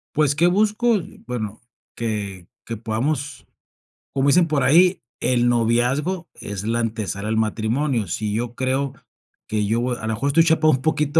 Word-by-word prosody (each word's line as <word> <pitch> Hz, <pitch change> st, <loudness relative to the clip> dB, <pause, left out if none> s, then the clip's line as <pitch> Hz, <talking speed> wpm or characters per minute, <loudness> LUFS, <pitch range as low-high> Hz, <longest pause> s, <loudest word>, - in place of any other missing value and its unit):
Pues, 145 Hz, -1 st, +3 dB
¿qué 170 Hz, +4 st, +4 dB
busco? 215 Hz, +5 st, +2 dB, 0.3 s
Bueno, 110 Hz, -4 st, -4 dB, 0.3 s
que 100 Hz, -6 st, -4 dB, 0.2 s
que 115 Hz, -, -4 dB
podamos, 125 Hz, +6 st, -3 dB, 0.7 s
como 135 Hz, 0 st, +1 dB
dicen 170 Hz, +4 st, +5 dB
por 150 Hz, -3 st, +1 dB
ahí, 180 Hz, +5 st, +5 dB, 0.2 s
el 120 Hz, 0 st, +2 dB
noviazgo 120 Hz, +9 st, +1 dB
es 100 Hz, -1 st, -6 dB
la 115 Hz, +1 st, 0 dB
ante 110 Hz, -2 st, -2 dB
sala 100 Hz, +3 st, -4 dB
al 110 Hz, -, 0 dB
matrimonio. 110 Hz, +2 st, 0 dB
Si 105 Hz, +4 st, -2 dB
yo 120 Hz, +2 st, -2 dB
creo 130 Hz, +1 st, -1 dB, 0.5 s
que 105 Hz, -1 st, 0 dB
yo 110 Hz, +3 st, +1 dB
voy 125 Hz, 0 st, -1 dB
a -, -, -11 dB
lo 110 Hz, -, 0 dB
mejor 120 Hz, +6 st, -2 dB
estoy 145 Hz, +4 st, +5 dB
chapado 160 Hz, -1 st, +4 dB
un 130 Hz, -, 0 dB
poquito 150 Hz, 0 st, +1 dB
125 Hz, 170 wpm, -22 LUFS, 110-150 Hz, 0.7 s, dicen